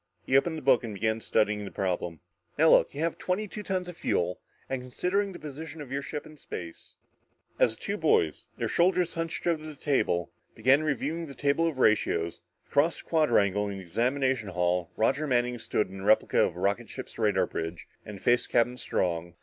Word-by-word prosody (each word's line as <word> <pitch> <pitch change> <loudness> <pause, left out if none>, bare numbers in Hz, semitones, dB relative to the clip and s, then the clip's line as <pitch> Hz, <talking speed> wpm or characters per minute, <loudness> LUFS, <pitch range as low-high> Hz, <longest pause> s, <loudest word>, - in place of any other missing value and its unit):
He 130 - +1
opened 160 +4 +3
the 155 - -7
book 130 -2 +4
and 110 -3 -5
began 110 +3 0
studying 105 -1 +1
the 100 - -6
problem. 90 -4 -3 0.4
"Now 160 +2 +6
look - - +4
you 145 - -3
have 165 0 -1
twenty 195 +4 -1
two 210 - -7
tons 185 -3 -2
of 180 - -7
fuel 90 - -1 0.3
and 135 -1 -3
considering 180 +11 -1
the 180 - -8
position 155 +2 -8
of 140 -3 -8
your 140 +1 -1
ship 145 +1 -5
in 155 - -13
space 85 - -9 0.3
" - - -40
As 110 - +4
the - - -15
two 200 - -2
boys, 120 - +2
their - - -1
shoulders 180 0 +2
hunched 165 0 -4
over 165 -3 +1
the 155 -1 -8
table, 130 - 0 0.2
began 130 +6 +4
reviewing 155 +2 -2
the 140 - -10
table 145 +5 +2
of 160 -5 -3
ratios, 85 -8 +2 0.2
across 150 +4 +2
the - - -14
quadrangle 105 - +3
in 100 - -5
the 95 - -8
examination 125 +4 0
hall 90 -1 0
Roger 135 +7 +1
Manning 125 -2 +1
stood 105 -3 -1
in 95 - -8
a - - -7
replica 110 +2 +3
of - - -4
a - - -8
rocket 100 +4 0
ship's 130 -1 -8
radar 100 -4 +3
bridge 80 0 -5 0.2
and 105 -2 -9
faced 120 +4 +2
Captain 120 +1 +2
Strong. 85 -6 -2
125 Hz, 205 wpm, -28 LUFS, 100-155 Hz, 0.4 s, Now